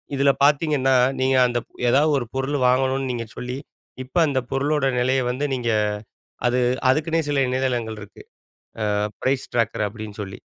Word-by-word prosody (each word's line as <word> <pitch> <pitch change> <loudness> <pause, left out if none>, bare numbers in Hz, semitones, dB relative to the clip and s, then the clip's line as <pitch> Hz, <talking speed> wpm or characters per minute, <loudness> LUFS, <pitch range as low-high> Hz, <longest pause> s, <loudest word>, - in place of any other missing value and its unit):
இதில 140 0 +4
பார்த்தீங்கன்னா, 145 -3 +3 0.3
நீங்க 130 0 +2
அந்த 120 0 -1 0.3
எதாவது 150 +5 +4
ஒரு 120 - -4
பொருள் 135 +2 -1
வாங்கணுன்னு 130 +1 +1
நீங்க 115 -1 -4
சொல்லி, 125 +1 -4 0.5
இப்ப 130 +7 -7
அந்த 140 -2 +1
பொருளோட 140 +1 +1
நெலைய 130 +1 +2
வந்து 140 +4 -2
நீங்க 120 -2 -2 0.8
அது 125 +1 +1 0.3
அதுக்கின்னே 160 +4 +2
சில 145 -1 +1
இணையதளங்கள் 125 -4 -1
இருக்கு. 100 - -12 0.7
அ - - +1 0.3
பிரைஸ் 130 0 0
ட்ராக்கர் 115 -2 0
அப்பிடின்னு 105 0 -9
சொல்லி. 95 -1 -9
130 Hz, 150 wpm, -23 LUFS, 120-140 Hz, 0.8 s, இதில